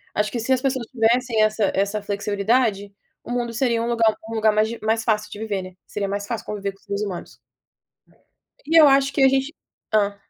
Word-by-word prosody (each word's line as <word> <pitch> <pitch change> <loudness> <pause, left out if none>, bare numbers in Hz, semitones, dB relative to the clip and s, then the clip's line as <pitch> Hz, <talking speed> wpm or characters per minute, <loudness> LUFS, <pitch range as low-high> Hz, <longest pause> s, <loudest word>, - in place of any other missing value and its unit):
Acho 210 0 0
que 240 - -3
se 260 +4 +1
as 255 - 0
pessoas 260 -3 -1
tivessem 235 -1 +1
essa 215 -2 +2
essa 200 +2 0
flexibilidade, 205 +1 0 0.3
o - - -8
mundo 240 -1 -1
seria 235 -1 +1
um 235 - -2
lugar 225 -2 +2
um 225 - -5
lugar 220 -1 +3
mais 215 +1 +2
di 235 - -6
mais 225 +1 0
fácil 215 -2 0
de 205 - -8
viver, 205 -3 -2
né. 185 - -9 0.2
Seria 200 -1 -3
mais 200 +1 -3
fácil 230 -2 -4
conviver 200 -1 -4
com 195 - -25
os - - -29
seres 200 +1 -3
humanos. 190 -4 -6 1.3
E 325 +2 +5
eu 300 - +8
acho 275 0 +4
que 280 - 0
a - - +8
gente 270 +3 0 0.4
hã. 205 -1 +2
220 Hz, 220 wpm, -22 LUFS, 205-245 Hz, 1.3 s, eu